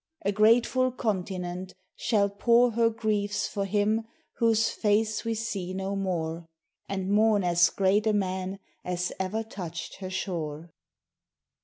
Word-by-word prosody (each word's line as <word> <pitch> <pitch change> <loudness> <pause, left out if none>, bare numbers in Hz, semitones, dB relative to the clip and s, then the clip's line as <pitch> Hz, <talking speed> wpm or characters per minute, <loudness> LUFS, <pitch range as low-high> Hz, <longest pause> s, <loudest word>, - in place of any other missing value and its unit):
A 200 - +3
grateful 235 +5 +4
continent 185 -5 -3 0.2
shall 205 -3 +2
pour 235 +4 +3
Her 230 0 +3
griefs 215 -2 -1
for 200 -1 -3
him 210 +3 +1 0.4
whose 225 -1 +3
face 215 0 +1
we 230 -1 -1
see 200 -5 -3
no 195 +1 -2
more: 170 -4 -2 0.4
And 190 0 -2
mourn 210 -1 +4
as 175 0 +4
great 200 +3 +2
a 215 - +3
man 190 -1 -1 0.3
as 180 0 -2
ever 195 +4 -1
touched 175 -7 -7
her 190 -1 -6
shore. 165 -4 -4
200 Hz, 135 wpm, -27 LUFS, 185-220 Hz, 0.4 s, grateful